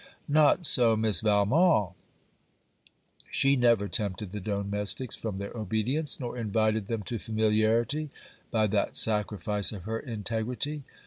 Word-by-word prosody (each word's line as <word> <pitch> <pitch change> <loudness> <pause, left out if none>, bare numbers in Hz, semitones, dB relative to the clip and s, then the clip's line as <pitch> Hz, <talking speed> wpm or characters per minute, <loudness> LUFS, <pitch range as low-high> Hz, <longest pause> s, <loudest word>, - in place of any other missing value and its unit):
Not 155 +4 +3
so 120 -5 +6
Miss 110 -5 +2
Valmont. 105 - +2 1.4
She 135 +1 +2
never 120 -5 +2
tempted 100 -2 -3
the 105 - -5
domestics 100 +4 -3
from 110 -4 -5
their 100 +3 -7
obedience, 115 - -2
nor 125 -2 -5
invited 110 -1 0
them 115 -2 -3
to 115 +3 -4
familiarity, 110 +7 0 0.4
by 110 -2 +1
that 105 -1 -1
sacrifice 105 -1 +2
of 100 -5 -8
her 110 +3 -4
integrity. 120 +6 -3
110 Hz, 125 wpm, -27 LUFS, 105-120 Hz, 1.4 s, so